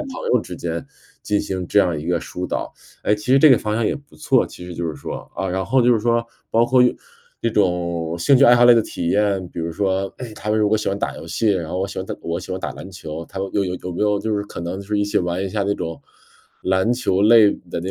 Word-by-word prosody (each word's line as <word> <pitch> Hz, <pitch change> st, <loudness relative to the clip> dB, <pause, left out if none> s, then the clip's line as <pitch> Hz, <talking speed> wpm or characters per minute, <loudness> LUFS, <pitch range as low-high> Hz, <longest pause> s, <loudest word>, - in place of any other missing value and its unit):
朋 295 Hz, -, -5 dB, 0.2 s
友 125 Hz, -, +4 dB
之 90 Hz, -, -8 dB
间 85 Hz, 0 st, -4 dB, 0.4 s
进 105 Hz, 0 st, 0 dB
行 95 Hz, -2 st, -4 dB
这 105 Hz, -, +2 dB
样 85 Hz, -5 st, +1 dB
一 75 Hz, -, -7 dB
个 85 Hz, -2 st, +1 dB
疏 90 Hz, 0 st, -5 dB
导。 -, -, -3 dB, 0.3 s
哎， 105 Hz, -, +1 dB
其 105 Hz, 0 st, -9 dB
实 135 Hz, -, +7 dB
这 155 Hz, -, +8 dB
个 130 Hz, -, +8 dB
方 105 Hz, 0 st, -2 dB
向 115 Hz, 0 st, 0 dB
也 -, -, 0 dB
不 140 Hz, -1 st, -18 dB
错， 130 Hz, -2 st, +2 dB
其 90 Hz, -, -11 dB
实 90 Hz, -, -7 dB
就 85 Hz, 0 st, -3 dB
是 80 Hz, -, -3 dB
说 -, -, -6 dB, 0.2 s
啊， 95 Hz, -, -2 dB
然 95 Hz, +1 st, -1 dB
后 130 Hz, -1 st, +3 dB
就 120 Hz, 0 st, +5 dB
是 -, -, +1 dB
说， 115 Hz, +1 st, +1 dB, 0.3 s
包 115 Hz, +1 st, +3 dB
括 125 Hz, 0 st, +5 dB
用 125 Hz, -, +3 dB, 0.5 s
这 115 Hz, -, +1 dB
种 85 Hz, -4 st, 0 dB
兴 135 Hz, +11 st, +4 dB
趣 135 Hz, -, +6 dB
爱 120 Hz, -, +8 dB
好 120 Hz, 0 st, +6 dB
类 120 Hz, -, +9 dB
的 115 Hz, -, +4 dB
体 85 Hz, -, -4 dB
验， 100 Hz, -3 st, +1 dB
比 -, -, -10 dB
如 85 Hz, 0 st, -3 dB
说， 95 Hz, +1 st, -1 dB
哎， 125 Hz, -3 st, -7 dB
他 105 Hz, -, -4 dB
们 110 Hz, -, +2 dB
如 105 Hz, -1 st, +3 dB
果 110 Hz, -, +3 dB
喜 105 Hz, -, -1 dB
欢 100 Hz, -, -2 dB
打 -, -, -3 dB
游 -, -, -9 dB
戏， 110 Hz, -, 0 dB
然 85 Hz, -5 st, -1 dB
后 90 Hz, -, -2 dB
我 95 Hz, -, -1 dB
喜 100 Hz, -, -7 dB
欢 95 Hz, -, -3 dB
打 -, -, -5 dB
我 85 Hz, +1 st, -3 dB
喜 95 Hz, +1 st, -7 dB
欢 95 Hz, -, -4 dB
打 -, -, -3 dB
篮 95 Hz, -, -9 dB
球， 80 Hz, -3 st, -7 dB
他 95 Hz, -, -8 dB
们 95 Hz, 0 st, -2 dB
有 100 Hz, -1 st, +2 dB
有 90 Hz, 0 st, -3 dB
有 90 Hz, -, -7 dB
没 90 Hz, -, -2 dB
有 105 Hz, -1 st, +2 dB
就 110 Hz, -1 st, -1 dB
是 100 Hz, -, -1 dB
可 85 Hz, -, -8 dB
能 85 Hz, +3 st, -4 dB
就 100 Hz, -, -9 dB
是 105 Hz, 0 st, 0 dB
一 100 Hz, -, +2 dB
起 105 Hz, +1 st, -2 dB
玩 90 Hz, +1 st, -1 dB
一 -, -, -2 dB
下 100 Hz, 0 st, -1 dB
那 100 Hz, 0 st, +1 dB
种， 80 Hz, 0 st, -5 dB, 0.6 s
篮 95 Hz, +5 st, +2 dB
球 110 Hz, -6 st, 0 dB
类 110 Hz, -1 st, +7 dB, 0.2 s
的 85 Hz, -, -4 dB
那 95 Hz, +2 st, -4 dB
100 Hz, 320 characters per minute, -21 LUFS, 90-110 Hz, 0.6 s, 类